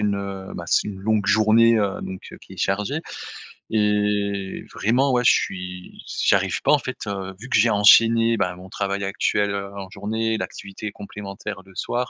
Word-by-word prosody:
une, 105 -1 +1
heu 100 -1 -6
bah 85 - -6
c'est 105 - +2
une 95 -2 -7
longue 105 0 +1
journée, 110 +3 +5
heu, 100 -2 0
donc 95 0 -8
qui - - -13
est - - -16
chargée. 105 +10 -1 0.7
Et 105 -2 0
vraiment, 130 +6 +2
ouais 125 - +2
je - - +7
suis 90 -1 -3
s - - -6
j'y - - 0
j'arrive - - +2
pas - - +3
en 150 - +5
fait, 130 - -6
heu, 95 -1 -4
vu 130 +4 -10
que - - +3
j'ai 115 - +4
enchaîné 115 +2 +6
ben 90 -3 -1
mon 90 +1 -12
travail 100 0 -2
actuel, 100 +1 0
heu, 100 0 -4
en 95 -1 -7
journée, 110 +2 -2
l'activité 105 0 -6
complémentaire 100 0 -7
le 95 -1 -18
soir, 125 +1 -2
105 Hz, 195 wpm, -23 LUFS, 95-110 Hz, 0.7 s, je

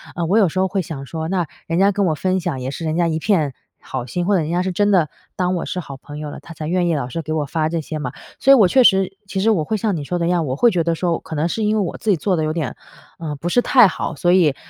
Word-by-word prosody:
呃， 170 - -1
我 195 +7 +3
有 195 -6 +4
时 185 - -8
候 190 0 +3
会 195 0 -1
想 140 -5 -7
说， 160 +2 -4
那 180 -1 0 0.2
人 165 - -1
家 195 +2 +4
跟 200 -1 +1
我 155 - +1
分 185 +4 0
享 170 -7 -3
也 130 +1 -4
是 165 - -6
人 155 +1 -1
家 175 -1 +2
一 160 -1 -1
片 160 -7 +1 0.3
好 130 -2 -5
心， 175 +8 -2
或 200 +2 +3
者 180 - +2
人 155 - -3
家 175 +1 0
是 190 - -1
真 205 +3 +1
的 175 -7 +3 0.3
当 180 0 0
我 175 - -2
是 180 - -3
好 140 -5 -7
朋 145 +2 -10
友 150 -1 -5
了 - - -8
她 165 - -12
才 155 - -6
愿 175 +2 +1
意 165 - +1
老 140 -4 -2
是 145 +7 -4
给 155 0 -6
我 155 -2 0
发 155 +2 -1
这 165 0 -1
些 155 0 -5
嘛。 125 -4 -4 0.3
所 270 - +5
以 275 - +10
我 210 -7 +6
确 260 +6 +4
实 195 -3 +3
其 195 - -3
实 220 +4 +3
我 180 -8 +1
会 215 +8 -1
像 210 -2 0
你 150 - -4
说 175 +5 -2
的 170 - -1
一 170 - +1
样， 175 -2 +1
我 130 - -1
会 235 +10 +4
觉 175 -4 +1
得 165 0 0
说 170 0 -1
可 160 - -8
能 155 +2 +1
是 220 +5 -2
因 210 +1 +2
为 215 - +2
我 175 - -4
自 220 - -3
己 190 - +4
做 185 +5 0
得 160 - 0
有 155 - 0
点， 155 -5 -3 0.4
呃， 155 -3 -4
不 155 +4 -5
是 245 +8 +3
太 245 -5 +6
好， 165 - -4
所 175 +5 +2
以 165 -7 +4
170 Hz, 360 characters per minute, -20 LUFS, 155-190 Hz, 0.4 s, 以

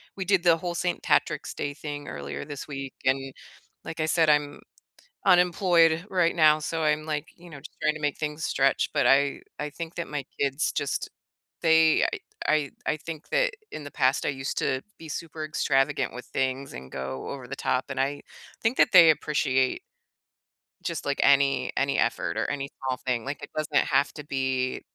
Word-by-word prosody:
we 190 - -4
did 190 -2 +3
the 170 -2 +5
whole 175 +1 -4
St. 175 +1 -1
Patrick's - - +1
Day 145 0 -3
thing 145 -1 -7
earlier 70 - -6
this 145 -1 -7
week, 135 -2 -6
and 135 0 +1 0.5
like 160 - -7
I 155 - +1
said, 160 0 +3
I'm 145 -1 +2 0.7
unemployed 175 -2 +4
right 175 -3 +2
now 155 -2 +5
so, 160 +1 -3
I'm, 155 0 +1
like, 150 -2 -3
you 175 0 -15
know, 150 - -9
just 145 - -13
trying 155 - +2
to 155 - -7
make 145 -1 -1
things 150 0 -3
stretch, 135 0 +2
but - - +2
I 140 +1 +3 0.2
I 150 0 -3
think 165 +2 -7
that 170 - -4
my 145 -2 -3 0.2
kids 140 +2 +1
just 140 - -2 0.5
they 160 -1 +5
I - - -2 0.3
I 150 -3 +2 0.2
I 150 - +1
think 160 0 -8
that - - +2 0.2
in 150 - -6
the 145 - -8
past, 130 0 +1
I - - +2
used 135 -1 -4
to 130 0 0 0.2
be 160 - -10
super 155 0 -5
extravagant 145 -2 +1
with 125 - -7
things 130 +1 -2
and 65 +1 -9
go 65 0 -5
over 135 -3 -7
the 135 - -5
top, 130 -1 0
and 130 -1 -2
I 140 +2 -1 0.4
think 230 +3 +1
that - - +5
they 170 -4 +9
appreciate 135 -4 +1 1.0
just, - - -4
like, - - -1
any 135 -2 +4
any 140 0 +1
effort - - 0
or - - 0
any 140 -1 -3
small 130 -1 -2
thing. 125 -2 -1
Like, 145 +2 -5
it - - -7
doesn't 155 -1 +1
have 140 0 +2
to 150 - -9
be 130 -2 -1
145 Hz, 195 wpm, -26 LUFS, 135-160 Hz, 1.0 s, they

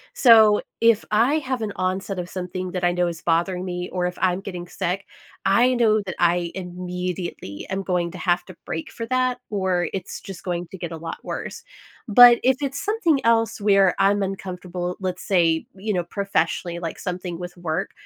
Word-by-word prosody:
so, 220 -4 +7 0.2
if 230 -1 +4
I 235 +8 +3
have 260 -3 -3
an 210 -2 -3
onset 185 +1 -2
of 175 - -5
something 185 0 -5
that 180 -1 -4
I 175 - +3
know 180 0 +1
is 170 -1 -5
bothering 175 +2 0
me 180 -1 -4
or 180 -1 -1
if 180 - -6
I'm 185 0 +2
getting 180 -3 -6
sick, 180 +2 -3 0.4
I 240 +6 +4
know 220 -3 +3
that 185 - -5
I 175 0 +2
immediately 180 - -5
am 195 +1 -2
going 175 -2 -1
to - - -9
have 175 -1 0
to 185 - -12
break 160 - -4
for 230 - -5
that, 255 0 +1
or 185 -4 0
it's 190 -2 -5
just 190 -2 -9
going 175 -1 -3
to 190 - -8
get 170 -1 -5
a - - -5
lot 165 +1 -6
worse, 460 - -5 0.5
but, 240 +2 +8
if 260 +1 +4
it's 280 -1 -3
something 400 -10 +1
else 225 -1 +2
where 195 -2 +4
I'm 200 +1 +3
uncomfortable, 180 -2 -4
let's 185 -1 -3
say, 165 -4 +2
you 210 +2 -3
know, 180 -2 0
professionally, 175 -2 -1
like 165 -2 -5
something 180 -2 -4
with 175 0 -7
work, 160 -2 -3
185 Hz, 195 wpm, -23 LUFS, 175-210 Hz, 0.5 s, but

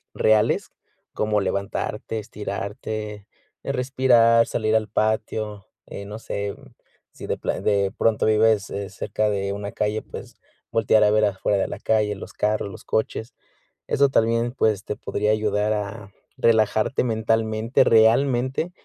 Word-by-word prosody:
reales, 110 0 +2 0.4
como 105 -1 0
levantarte, 100 +3 -3
estirarte, 105 0 -5 0.4
eh, - - -2
respirar, 125 -3 +4
salir 110 -1 0
al 110 -1 +1
patio. 110 -1 -2 0.2
Eh, 100 - -8
no 105 +2 -7
sé, 100 -2 -4 0.6
si - - -10
de - - -1
pla - - -3
de 100 -1 +1
pronto, 115 -1 +1
vives, 110 -2 +3
eh, 100 -1 -4
cerca 105 +2 -2
de 100 -1 -1
una 100 0 -5
calle, 105 +1 -1
pues, - - -10 0.4
voltear 110 -1 +3
a 105 - +5
ver 110 0 +3
afuera 100 0 0
de 95 - 0
la - - -7
calle, 105 -2 +1
los 95 - -9
carros, 105 -1 -1
los 100 - -11
coches. 110 +1 -2 0.5
Eso 140 0 +3
también, 115 -1 +1
pues, 110 -6 +1
te 105 - -3
podría 105 +1 -1
ayudar, 105 0 +1
a 105 0 -5 0.3
relajarte 110 +2 +2
mentalmente, 110 0 +1
realmente. 125 +7 +3
110 Hz, 145 wpm, -23 LUFS, 105-115 Hz, 0.6 s, a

